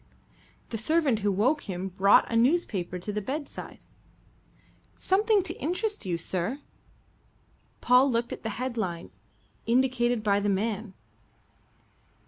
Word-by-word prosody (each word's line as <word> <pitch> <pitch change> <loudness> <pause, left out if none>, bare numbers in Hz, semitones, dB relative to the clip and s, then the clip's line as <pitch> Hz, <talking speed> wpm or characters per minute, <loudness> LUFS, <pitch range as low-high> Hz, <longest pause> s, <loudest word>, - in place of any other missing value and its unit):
The 225 - -3
servant 290 -2 +1
who 205 -1 +1
woke 240 +7 0
him 185 +1 -3
brought 190 +2 +4
a - - 0
newspaper 230 - +1
to 195 +4 -5
the 210 - -2
bedside. 285 +7 -6 1.1
"Something 410 +1 +2
to 345 -2 -3
interest 365 - -2
you, 175 -2 0
sir." 185 +9 -3 1.2
Paul 250 +2 +5
looked 235 -1 -1
at - - -8
the 220 - -3
headline 220 -9 -3 0.6
indicated 245 -1 +2
by 200 -2 +2
the 205 0 0
man. 210 +1 -2
230 Hz, 120 wpm, -27 LUFS, 200-275 Hz, 1.2 s, Paul